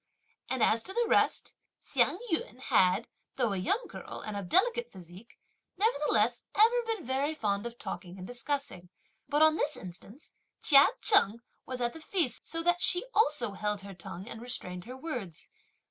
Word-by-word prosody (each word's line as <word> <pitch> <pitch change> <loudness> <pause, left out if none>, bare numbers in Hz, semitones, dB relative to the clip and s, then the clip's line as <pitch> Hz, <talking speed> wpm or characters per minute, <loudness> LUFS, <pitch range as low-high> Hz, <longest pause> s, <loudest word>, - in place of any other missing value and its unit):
And 260 -3 0
as 225 - +3
to 380 - -6
the 475 +2 +1
rest, 485 - +1 0.3
Hsiang - - +1
yün 250 -7 -1
had, 200 -4 +2 0.3
though 240 -6 0
a - - -2
young 395 - 0
girl, - - -9
and 215 - -5
of 200 -3 -6
delicate 475 +5 +2
physique, 185 +4 -14 0.4
nevertheless 285 - +2
ever 465 +3 +5
been 445 - -3
very 275 +5 -1
fond 205 -4 -2
of 235 0 -10
talking 180 -5 -7
and 185 - -8
discussing; 245 -6 -4 0.4
but, 295 +1 +3
on 315 0 +5
this 300 - -1
instance, 195 - -12 0.3
Chia 280 -2 +8
Cheng 235 - +5 0.3
was 255 -1 -5
at 240 0 0
the 320 - -9
feast, 325 -6 0
so 330 0 -3
that 350 +1 +2
she 365 +4 +4
also 295 - +2
held 210 0 -3
her 200 0 -10
tongue 180 +2 -9
and 225 -2 -8
restrained 180 -7 -2
her 250 +2 -9
words. 250 - -7
245 Hz, 175 wpm, -30 LUFS, 200-320 Hz, 0.4 s, Chia